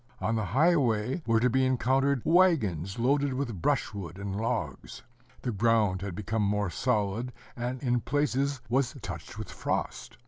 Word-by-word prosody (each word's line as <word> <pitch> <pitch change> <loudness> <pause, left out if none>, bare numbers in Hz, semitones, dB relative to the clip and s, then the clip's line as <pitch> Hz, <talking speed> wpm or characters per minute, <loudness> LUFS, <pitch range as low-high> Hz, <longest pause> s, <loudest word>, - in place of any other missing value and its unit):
On 110 - 0
the 110 -2 0
highway 130 - +2
were 115 -1 +4
to 125 - +3
be 130 +2 +2
encountered 130 +1 +2
wagons 110 - +3
loaded 135 +3 +1
with 120 -9 -3
brushwood 95 -3 -1
and 100 -1 -4
logs. 110 +3 -3 0.4
The 125 - -1
ground 105 -3 +2
had 95 -3 -4
become 105 +3 -2
more 105 -2 0
solid, 115 +1 0 0.2
and 125 +2 -3
in 125 -2 +1
places 140 0 0
was 130 +1 +1
touched - - -7
with - - -6
frost. - - -3
120 Hz, 150 wpm, -29 LUFS, 105-135 Hz, 0.4 s, were